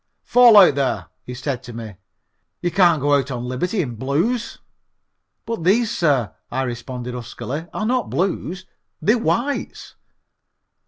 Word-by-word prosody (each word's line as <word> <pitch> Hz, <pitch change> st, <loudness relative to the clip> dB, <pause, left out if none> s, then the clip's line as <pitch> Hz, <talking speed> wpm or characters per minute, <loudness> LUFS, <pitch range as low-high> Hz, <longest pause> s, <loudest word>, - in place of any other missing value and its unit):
"Fall 240 Hz, -3 st, +6 dB
out, 190 Hz, -7 st, +8 dB
there," 135 Hz, -2 st, -1 dB, 0.2 s
he 125 Hz, -, -6 dB
said 130 Hz, -1 st, -3 dB
to 125 Hz, -2 st, -10 dB
me. 110 Hz, -3 st, -8 dB, 0.6 s
"You 175 Hz, -, -2 dB
can't 175 Hz, -4 st, +4 dB
go 145 Hz, 0 st, +3 dB
out 140 Hz, -1 st, +2 dB
on 125 Hz, -2 st, -4 dB
liberty 180 Hz, -, -1 dB
in 120 Hz, -5 st, -6 dB
Blues." 170 Hz, -, -1 dB, 0.9 s
"But 230 Hz, -7 st, -4 dB
these, 215 Hz, +5 st, +3 dB
sir," 135 Hz, -, +1 dB, 0.2 s
I 130 Hz, +2 st, -1 dB
responded 125 Hz, 0 st, -5 dB
huskily, 125 Hz, +6 st, -6 dB
"are 215 Hz, -, -3 dB
not 250 Hz, 0 st, 0 dB
Blues; 185 Hz, 0 st, -2 dB, 0.3 s
they're 225 Hz, +4 st, +2 dB
Whites." 250 Hz, +5 st, -2 dB
145 Hz, 145 wpm, -21 LUFS, 125-205 Hz, 0.9 s, out